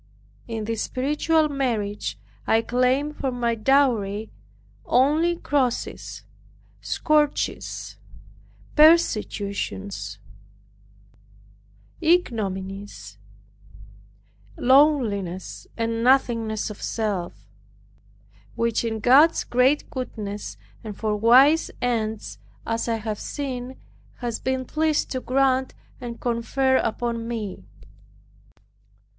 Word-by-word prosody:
In 225 -2 -4
this 225 -1 -2
spiritual 300 +4 +1
marriage 215 - -2 0.3
I 225 +1 +3
claimed 255 +5 +1
for 270 - -1
my 240 -1 0
dowry 220 -4 +1 0.5
only 305 +7 +3
crosses, 275 -7 -2 0.6
scourges, 300 -1 -1 0.8
persecutions, 205 - +2 1.8
ignominies, 195 - -1 1.4
lowliness, 240 - +2
and 230 0 -1
nothingness 230 -5 +2
of 210 - -11
self, 205 -6 -3 1.1
which 230 -1 0
in 220 -2 -3
God's 280 +8 +5
great 255 +4 +2
goodness, 210 -6 -5 0.3
and 210 -3 -7
for 215 -1 -1
wise 260 +9 +5
ends, 220 -3 -2 0.3
as 230 +1 -2
I 230 - +1
have 215 -1 -4
seen, 260 -2 -5 0.4
has 240 -3 -4
been 260 0 -2
pleased 310 +2 0
to 260 - -1
grant 260 0 +1 0.2
and 235 -2 -7
confer 260 +3 +1
upon 230 0 -2
me. 220 -5 -5
235 Hz, 85 wpm, -24 LUFS, 215-270 Hz, 1.8 s, God's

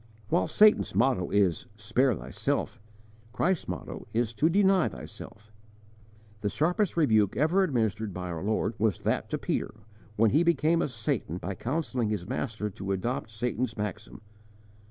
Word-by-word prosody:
While 95 - +2
Satan's 215 0 +4
motto 120 -8 +2
is 100 +3 +1
'Spare 115 +4 +1
thyself!' 65 -3 -3 0.5
Christ's 180 -1 0
motto - - -6
is 120 -1 +1
to 150 +8 +2
Deny 190 0 +4
thyself!' 100 +11 -11 0.9
The 105 - 0
sharpest 175 - 0
rebuke 110 - +3
ever 160 +7 +3
administered 110 - 0
by 90 -1 -5
our 80 -1 -4
Lord 110 +2 0
was 105 -5 +2
that - - -1
to - - -1
Peter - - -2 0.4
when 110 0 +4
he 150 - +4
became 170 -1 +3
a - - +1
Satan 110 - -2
by 100 +2 -4
counselling 130 - -2
his 100 -5 -3
Master 110 -4 -3
to 95 +1 -5
adopt 105 +3 -2
Satan's 115 +1 -2
maxim. 105 +1 -5
110 Hz, 150 wpm, -28 LUFS, 100-150 Hz, 0.9 s, Satan's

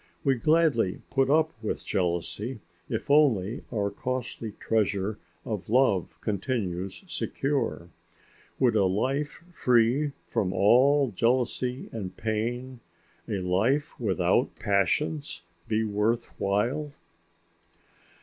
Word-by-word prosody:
We 135 - +4
gladly 135 - +2
put 135 -1 +2
up 160 +2 +3
with 110 - -3
jealousy 95 +7 -2 0.3
if 140 - -2
only 120 -8 +3
our 100 -3 -1
costly 125 -4 -4
treasure 105 -1 0 0.3
of 105 -4 -4
love 115 -7 +2
continues 100 - -2
secure. 135 - -2 0.7
Would 125 -4 +3
a 100 -3 +4
life 135 - -1
free 125 +3 +3
from 95 -3 -1
all 130 +6 +4
jealousy 125 +4 0
and 95 -5 -6
pain, 120 +4 -2 0.5
a 100 -4 -1
life 110 +12 +1
without 95 +1 +1
passions, 100 - 0 0.2
be 110 0 +1
worth 110 +3 0
while? 120 +10 0
115 Hz, 100 wpm, -27 LUFS, 100-135 Hz, 0.7 s, We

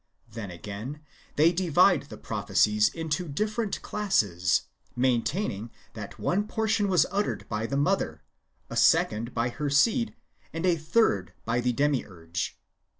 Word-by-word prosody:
Then, 110 -3 -6
again, 105 - -7 0.3
they 160 +3 +5
divide 180 -2 +3
the - - -9
prophecies 105 0 +2
[into 165 +2 -3
different 215 +8 -2
classes], 100 - +1 0.3
maintaining 125 - 0 0.2
that 105 -3 -8
one 205 +4 0
portion 220 -1 +1
was 180 -5 +4
uttered 205 +1 -1
by 110 +1 -2
the 140 - -2
mother, 140 - 0 0.4
a - - -7
second 115 +3 +3
by 120 +1 +1
her 145 +4 -3
seed, 225 - +2 0.4
and 165 +2 -2
a 180 -2 +4
third 155 - +1
by 115 +2 0
the 125 +1 +1
Demiurge. 110 - -2
140 Hz, 135 wpm, -27 LUFS, -, 0.4 s, they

